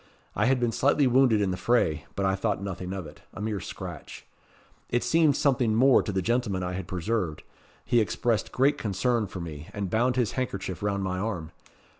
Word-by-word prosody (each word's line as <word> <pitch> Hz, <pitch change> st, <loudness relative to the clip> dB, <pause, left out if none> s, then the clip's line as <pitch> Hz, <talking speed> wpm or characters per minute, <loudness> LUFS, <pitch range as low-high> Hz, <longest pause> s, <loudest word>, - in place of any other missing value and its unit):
I -, -, +2 dB
had 130 Hz, 0 st, +3 dB
been 120 Hz, -1 st, +1 dB
slightly 140 Hz, +4 st, +3 dB
wounded 125 Hz, -4 st, +4 dB
in 95 Hz, -2 st, +1 dB
the 90 Hz, -, -3 dB
fray; 90 Hz, -8 st, +1 dB
but 100 Hz, -, -1 dB
I 95 Hz, -, +2 dB
thought 100 Hz, 0 st, -1 dB
nothing 95 Hz, -2 st, -5 dB
of 95 Hz, -3 st, -4 dB
it 75 Hz, 0 st, -12 dB
a -, -, -7 dB
mere 105 Hz, -1 st, -2 dB
scratch. -, -, -8 dB, 0.6 s
It 120 Hz, -, +1 dB
seemed 160 Hz, -4 st, +3 dB
something 125 Hz, -6 st, +2 dB
more 130 Hz, +3 st, +6 dB
to 105 Hz, -, -4 dB
the 95 Hz, -1 st, -1 dB
gentleman 105 Hz, -4 st, 0 dB
I 90 Hz, 0 st, -3 dB
had 95 Hz, -1 st, -5 dB
preserved. 90 Hz, -3 st, -2 dB, 0.4 s
He 120 Hz, 0 st, +3 dB
expressed 110 Hz, 0 st, 0 dB
great 135 Hz, +3 st, +2 dB
concern 110 Hz, +2 st, 0 dB
for 90 Hz, -1 st, -7 dB
me, 80 Hz, -2 st, -7 dB
and 100 Hz, -3 st, -3 dB
bound 120 Hz, +3 st, +2 dB
his 120 Hz, -4 st, +1 dB
handkerchief 100 Hz, -8 st, -3 dB
round 100 Hz, -1 st, -1 dB
my 90 Hz, -1 st, -2 dB
arm. 90 Hz, -6 st, -3 dB
105 Hz, 200 wpm, -27 LUFS, 95-120 Hz, 0.6 s, more